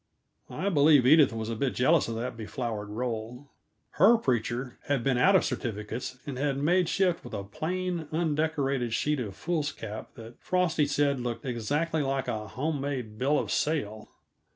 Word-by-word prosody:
I 200 - -2
believe 145 -5 +5
Edith 150 +1 +6
was 110 -1 -4
a - - -2
bit 130 +3 -1
jealous 155 +5 +3
of 115 - -3
that 115 +2 -4
beflowered 110 -2 -4
roll. 120 +3 -5 0.5
Her 220 +7 +7
preacher 125 - -2
had 140 -4 0
been 135 -3 +1
out 190 +9 +5
of 190 - +4
certificates, 115 +2 -4
and 135 -4 -5
had 140 -1 0
made 175 +5 +2
shift 180 -3 +1
with - - -7
a 100 - -4
plain, 175 - -3
undecorated 150 -6 0
sheet 150 -1 0
of 105 -6 -5
foolscap 145 -10 -4
that 115 +1 -12
Frosty 175 -5 +1
said 145 -1 +1
looked 120 +2 -4
exactly 145 +7 -1
like 135 -1 -1
a 110 -1 -3
home 145 +5 -2
made 125 -7 -4
bill 140 +4 +2
of - - -2
sale. 110 -9 -1
135 Hz, 170 wpm, -28 LUFS, 115-155 Hz, 0.5 s, Her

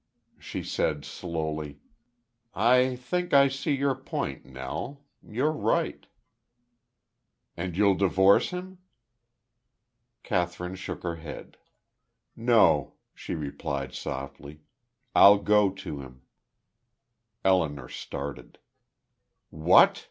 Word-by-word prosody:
She - - -6
said, 75 -2 -1
slowly: 80 -4 -5 0.8
"I 125 +3 +4
think 175 +7 -2
I 140 0 +7
see 135 +2 -1
your 140 0 +1
point, 70 - -5
Nell. 65 - -6 0.2
You're 130 +8 -1
right.' 155 - -1 1.5
"And 85 0 -5
you'll 100 -1 +5
divorce 95 +1 +4
him?" 180 0 -7 1.4
Kathryn 90 0 -2
shook 95 - -7
her 85 -1 -3
head. 80 -2 -9 0.8
"No," 115 -1 +3 0.2
she - - -6
replied 70 -2 -4
softly, 70 +3 -7 0.5
"I'll 100 +1 +8
go 105 0 +3
to 95 -6 -7
him." 65 -1 -13 1.2
Elinor 80 -9 +1
started. 70 +3 -7 0.9
"What!" 80 0 +5
95 Hz, 95 wpm, -27 LUFS, 75-125 Hz, 1.5 s, I'll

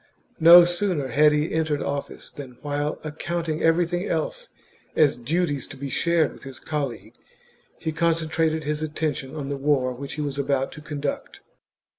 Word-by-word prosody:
No 170 +2 +10
sooner 175 -6 -1
had 150 +5 +5
he 150 +2 0
entered 155 -2 0
office 140 0 -5
than, 130 -5 -10
while 145 +1 -2
accounting 160 +1 -3
everything 175 +3 +2
else - - -2 0.5
as 150 -3 +4
duties 145 +3 -1
to 145 - -10
be 140 0 -5
shared 170 +1 +2
with - - -15
his 135 -2 -9
col 150 -3 -2
league, 120 - -11 0.6
he 160 - -3
concentrated 160 -1 0
his 150 +1 -2
attention 150 -3 -3
on 140 -3 -4
the 140 - -2
war 135 -2 +1
which 140 +3 -7
he 155 - -4
was 140 -1 -3
about 135 -1 0
to 150 - -10
conduct. 150 -2 -5
150 Hz, 165 wpm, -24 LUFS, 140-165 Hz, 0.6 s, No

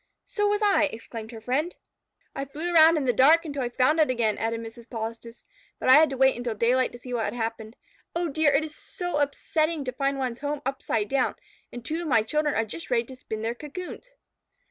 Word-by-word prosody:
"So 415 -2 0
was 415 +1 +1
I," 400 -6 +4
exclaimed 225 -4 -7
her 225 - -8
friend. 280 +9 -1 0.6
"I 275 - -3
flew 315 +6 -4
around 325 0 +7
in 290 - -1
the 245 - +2
dark 310 +8 +5
until 285 -3 -4
I 245 - -1
found 255 +6 +2
it 310 - +4
again," 230 -4 +1
added 225 0 -1
Mrs. 230 +1 -10
Polistes, 230 0 -6 0.3
"but - - -1
I - - +10
had 310 +3 +7
to 270 - -5
wait 265 0 +4
until 240 -2 -3
daylight 250 +4 +2
to - - -8
see 250 +1 -8
what 230 -2 0
had - - -3
happened. 225 -1 -4 0.4
Oh, 345 0 0
dear! 315 0 +2
It 280 +3 +2
is 305 - -9
so 355 -4 -4
upsetting 305 +1 0
to 255 - -2
find 275 +1 -1
one's 255 -3 -3
home 290 0 -3
upside 245 -5 -1
down, 270 +1 0 0.4
and 240 -1 -9
two 320 +2 -2
of 340 - -4
my 230 -6 +3
children 300 +5 0
are 225 - +1
just 275 +10 -8
ready 235 -2 +2
to 260 +2 -11
spin 220 -3 -6
their 230 +1 -1
cocoons." 355 - -8
265 Hz, 230 wpm, -26 LUFS, 230-310 Hz, 0.6 s, I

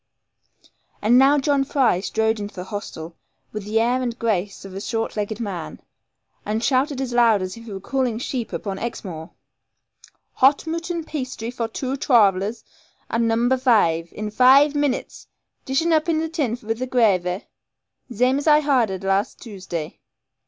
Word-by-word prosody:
And 235 +4 +4
now 275 +2 +5
John 280 -1 +2
Fry 265 -9 +2
strode 220 +3 0
into 205 0 -6
the 180 - -5
hostel, 175 -4 -7 0.4
with 215 -2 -6
the 215 +2 +1
air 245 +3 +1
and 240 -2 -3
grace 205 -4 -2
of 195 - -9
a 195 - -6
short 225 +1 -3
legged 210 +1 -3
man, 195 -8 -5 0.6
and 215 +2 -2
shouted 270 +2 +1
as 260 -2 -3
loud 230 -5 +4
as 185 0 -5
if 230 0 -12
he 225 - -9
was 195 -1 -7
calling 255 -3 -1
sheep 245 -1 -4
upon 195 -2 -4
Exmoor, 175 -8 -6 1.1
'Hot 275 +4 +4
mooton 335 +1 -3
pasty 255 -6 -5
for 235 -2 -3
twoo 260 +4 -4
trarv'lers, 210 -5 +2 0.5
at 230 - +1
number 235 +3 +2
vaive, 175 -10 +2
in 215 0 -5
vaive 270 +5 +6
minnits! 290 -3 -2 0.4
Dish 270 +4 +1
un 340 - +3
up 315 +1 +2
in 325 - +2
the 320 +1 -1
tin 285 -8 -1
with 225 +2 -3
the 255 - -2
grahvy, 195 -7 +1 0.7
zame 250 +4 +2
as 290 - -5
I 300 0 +6
hardered 235 -10 +1
last 195 +2 0
Tuesday.' 185 -8 -7
230 Hz, 165 wpm, -22 LUFS, 205-265 Hz, 1.1 s, vaive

